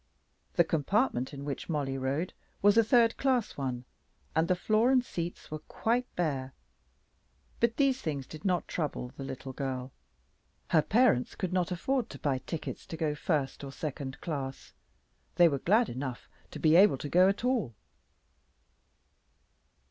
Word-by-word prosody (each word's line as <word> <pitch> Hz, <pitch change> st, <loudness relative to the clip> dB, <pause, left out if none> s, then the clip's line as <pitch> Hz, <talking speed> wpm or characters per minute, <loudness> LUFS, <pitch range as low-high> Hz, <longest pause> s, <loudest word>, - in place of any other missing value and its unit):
The 170 Hz, -, +6 dB
compartment 160 Hz, -, 0 dB
in 140 Hz, -1 st, -7 dB
which 145 Hz, +3 st, -5 dB
Mollie 140 Hz, -4 st, -1 dB
rode 140 Hz, +7 st, -1 dB, 0.3 s
was 205 Hz, 0 st, +6 dB
a 230 Hz, -, +6 dB
third 230 Hz, 0 st, +4 dB
class 255 Hz, -5 st, +1 dB
one, 130 Hz, -3 st, -3 dB, 0.5 s
and 160 Hz, +1 st, +3 dB
the 185 Hz, -, +3 dB
floor 215 Hz, +6 st, +2 dB
and 255 Hz, -2 st, +4 dB
seats 170 Hz, -5 st, -5 dB
were 155 Hz, -, -4 dB
quite 235 Hz, +10 st, -1 dB
bare. 135 Hz, -6 st, -1 dB, 1.1 s
But 235 Hz, 0 st, +2 dB
these 270 Hz, -2 st, +2 dB
things 140 Hz, -4 st, -3 dB
did 155 Hz, +2 st, -11 dB
not 180 Hz, -3 st, 0 dB
trouble 145 Hz, -6 st, -3 dB
the 135 Hz, -, -7 dB
little 135 Hz, 0 st, -6 dB
girl. 130 Hz, -1 st, -4 dB, 0.8 s
Her 160 Hz, -, +6 dB
parents 215 Hz, -, +3 dB
could 185 Hz, -2 st, -3 dB
not 180 Hz, -2 st, +1 dB
afford 240 Hz, +7 st, -1 dB
to -, -, -8 dB
buy 135 Hz, -3 st, 0 dB
tickets 155 Hz, +4 st, -6 dB
to 160 Hz, -, -6 dB
go 155 Hz, -2 st, 0 dB
first 150 Hz, -3 st, -1 dB
or 135 Hz, -, -6 dB
second 135 Hz, -2 st, -5 dB
class. 135 Hz, -5 st, -5 dB, 0.6 s
They 175 Hz, -, +7 dB
were 140 Hz, -4 st, 0 dB
glad 220 Hz, -, +3 dB
enough 130 Hz, 0 st, -5 dB, 0.2 s
to -, -, -8 dB
be 160 Hz, 0 st, +4 dB
able 190 Hz, -5 st, +7 dB
to 145 Hz, -, -5 dB
go 180 Hz, +5 st, +5 dB
at 200 Hz, +5 st, -2 dB
all. 230 Hz, -, 0 dB
160 Hz, 160 wpm, -30 LUFS, 135-210 Hz, 1.1 s, They